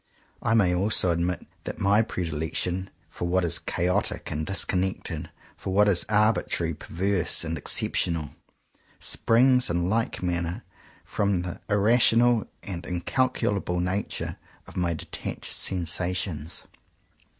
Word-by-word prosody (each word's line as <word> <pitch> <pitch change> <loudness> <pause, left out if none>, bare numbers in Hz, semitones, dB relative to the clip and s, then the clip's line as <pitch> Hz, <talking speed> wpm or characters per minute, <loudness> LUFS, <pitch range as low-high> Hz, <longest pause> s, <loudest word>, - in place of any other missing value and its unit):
I 115 - +2
may 95 -5 +4
also 95 0 +3
admit 85 +1 -1 0.2
that - - -5
my 100 +2 +4
predilection 90 0 -2 0.2
for 85 - -4
what 90 +1 +2
is 85 - +2
chaotic 90 +1 -1
and 75 +1 -3
dis 100 - +2
connected, 90 -4 -2 0.3
for 95 - -5
what 105 +1 +5
is 95 -4 +3
arbitrary, 105 -6 +2
perverse, 90 +2 -1
and 80 0 -2
exceptional, 80 +1 0 0.7
springs 125 +2 +3
in 85 +1 0
like 115 0 -1
manner 85 -1 -2 0.4
from 100 -3 0
the 90 -1 -6
irrational 115 +2 +4 0.2
and 90 -3 -5
incalculable 90 0 0
nature 90 +3 -2 0.3
of - - -14
my 85 -2 0
detached - - -4
sensations. 90 -2 0
90 Hz, 120 wpm, -26 LUFS, 85-105 Hz, 0.7 s, what